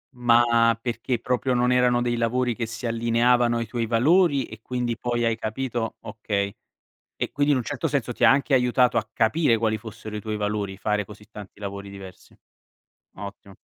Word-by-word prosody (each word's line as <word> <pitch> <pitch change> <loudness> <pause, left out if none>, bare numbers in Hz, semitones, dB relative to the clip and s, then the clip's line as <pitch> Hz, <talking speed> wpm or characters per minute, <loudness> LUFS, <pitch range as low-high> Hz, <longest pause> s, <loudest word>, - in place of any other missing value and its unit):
Ma, 120 -1 +4
perché 120 +1 -2
proprio 125 +1 0
non 125 +1 +2
erano 125 -1 +3
dei 120 -1 0
lavori 120 +1 0
che 115 -1 -3
si 115 +2 -7
allineavano 120 +1 +2
ai 115 - -2
tuoi 115 +1 -3
valori 140 +4 +3
e 110 0 -12
quindi 125 -1 -2
poi 120 0 -1
hai 115 -1 +1
capito 115 +1 -3
okay. 105 -2 -3 0.6
E - - -2
quindi 145 +1 +2
in 140 - +3
un 125 - -2
certo 145 +4 -2
senso 130 -4 -1
ti - - -3
ha - - +8
anche 140 +1 +1
aiutato 125 0 +3
a 110 - 0
capire 115 +2 +2
quali 110 -1 0
fossero 110 -1 -9
i 105 - -4
tuoi 110 0 -3
valori, 105 -2 -2
fare 105 +1 0
così 105 +1 -14
tanti 105 -3 -11
lavori 100 -1 -6
diversi. 95 -2 -12 0.8
Ottimo. 100 0 -9
115 Hz, 185 wpm, -24 LUFS, 110-125 Hz, 0.8 s, ha